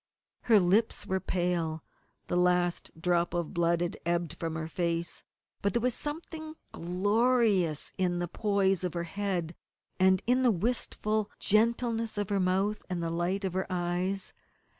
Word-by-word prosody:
Her 220 -3 +6
lips 200 +5 +2
were 190 0 0
pale; 175 -4 -1 0.4
the - - -2
last 180 0 +2
drop 175 0 +1
of 170 -3 -2
blood 170 0 +2
had 175 - -2
ebbed 170 -1 -1
from 165 -1 -3
her 160 0 -3
face; 170 0 -2 0.4
but 200 - +1
there 235 - +1
was 250 -1 +2
something 315 +2 -5 0.2
glorious 205 - +1
in 180 -1 +1
the 175 0 -1
poise 195 -1 +1
of 180 -1 -2
her 170 - -1
head, 175 -2 -2 0.5
and 185 0 +4
in 250 +2 +3
the 255 - +4
wistful 215 0 0
gentleness 230 +1 +1
of 205 -2 -1
her 200 -1 +1
mouth 190 +3 +1
and 175 -2 -2
the 165 - -1
light 180 +4 -1
in 190 - -1
her 190 +1 -1
eyes. 180 +2 -2
185 Hz, 160 wpm, -30 LUFS, 175-210 Hz, 0.5 s, Her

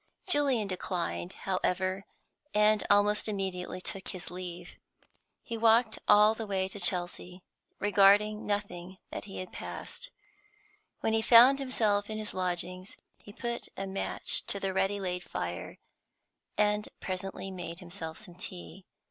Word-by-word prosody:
Julian 275 - +3
declined, 180 -1 -3
however, 185 0 -1 0.5
and 210 0 +4
almost 205 +1 +4
immediately 190 -3 -3
took 190 +1 -5
his 180 -2 -7
leave. 180 -1 -7 0.7
He 230 -1 -5
walked 225 0 +4
all 210 +1 +7
the 225 -1 -6
way 190 -1 0
to 205 - -6
Chelsea, 180 0 0 0.3
regarding 205 +1 +4
nothing 190 -3 -3
that - - -5
he 195 -2 -5
passed. 480 - -7 0.9
When 220 - +1
he 225 - +3
found 245 +5 +8
himself 215 -6 +1
in 215 - -3
his 215 -1 -5
lodgings 185 0 -3 0.2
he 205 - -13
put 235 +2 -4
a 195 - -3
match 195 0 0
to 200 - -2
the 195 -1 -2
ready 195 +2 +1
laid 180 -2 -3
fire, - - -5 0.8
and 210 0 +2
presently 190 +1 -4
made 175 -2 -6
himself 170 -3 -7
some 205 -5 -9
tea. 180 +1 -9
195 Hz, 135 wpm, -30 LUFS, 185-210 Hz, 0.9 s, found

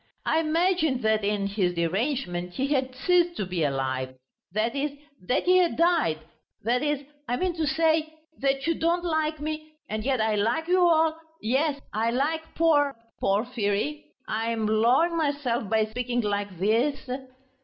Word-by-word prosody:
I 320 - +2
imagined 320 -4 +1
that 220 -1 +2
in 200 0 0
his 195 -3 0
derangement 180 - -1
he 270 - 0
had 260 -2 -1
ceased 350 +4 +2
to 200 - -1
be 180 -3 -2
alive... 130 -2 -1 0.4
that 220 +6 0
is, 280 +1 -1 0.3
that 250 - +2
he 365 +1 +5
had 350 -2 +2
died... 335 - +3 0.5
that 240 +3 +1
is, 295 -1 -1 0.2
I 245 - 0
mean 365 +3 0
to 315 -2 0
say... 315 +1 +2 0.3
that 275 0 0
you 335 - +2
don't 340 +2 0
like 315 -2 0
me... 310 +1 -5
and 215 0 -3
yet 260 0 +1
I 220 0 +2
like 230 +10 0
you 365 +1 +3
all... 325 -2 +3 0.2
Yes, 275 +6 0
I 225 +2 +1
like 285 +7 0
Por... 290 -4 +3 0.2
Porfiry... 215 +6 0 0.2
I 225 +1 -1
am 225 -1 -1
lowering 240 +11 +3
myself 285 -8 -1
by 220 0 +3
speaking 245 +2 -2
like 205 -3 -2
this...." 230 - +1
260 Hz, 165 wpm, -26 LUFS, 215-315 Hz, 0.5 s, he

